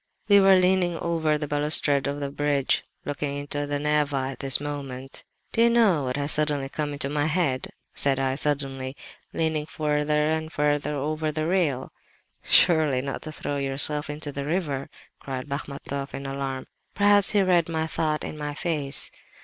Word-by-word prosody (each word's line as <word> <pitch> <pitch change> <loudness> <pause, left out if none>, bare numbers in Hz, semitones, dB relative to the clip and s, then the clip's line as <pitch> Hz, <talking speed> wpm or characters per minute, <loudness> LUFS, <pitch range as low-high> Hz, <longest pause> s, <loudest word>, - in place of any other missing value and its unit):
"We 200 -1 +7
were 195 -1 +6
leaning 180 -2 +2
over 160 -3 0
the 150 0 -4
balustrade 145 -1 +2
of 140 +1 -3
the 140 -1 -3
bridge, 145 -1 0 0.2
looking 145 0 -2
into 145 0 -3
the 145 0 -1
Neva 145 -2 0
at - - -11
this 135 -2 +5
moment. 135 -2 -6 0.3
"'Do 230 - +1
you 235 - +6
know 210 - +3
what 125 +1 -2
has 145 +1 +2
suddenly 145 -3 +1
come 145 0 -3
into 140 -1 -1
my 145 +1 0
head?' 150 -6 0 0.3
said 140 -1 +2
I, 135 -1 0
suddenly—leaning 145 +2 -3
further 150 0 0
and 160 0 -2
further 145 -1 0
over 155 +2 -2
the 155 +1 -2
rail. 160 -7 0 0.5
"'Surely 155 -7 +4
not 140 -1 -4
to 155 - -7
throw 145 -1 -4
yourself 140 +2 0
into 150 0 -4
the 140 0 -4
river?' 145 -4 -2 0.3
cried 130 -1 -6
Bachmatoff 140 0 -5
in 140 - -6
alarm. 135 -1 -4 0.3
Perhaps 205 0 +4
he 205 -2 +4
read 175 -3 +2
my 160 -1 -1
thought 155 -1 -1
in 155 - -6
my 145 -1 -4
face. 150 -5 +1
145 Hz, 170 wpm, -25 LUFS, 140-160 Hz, 0.5 s, We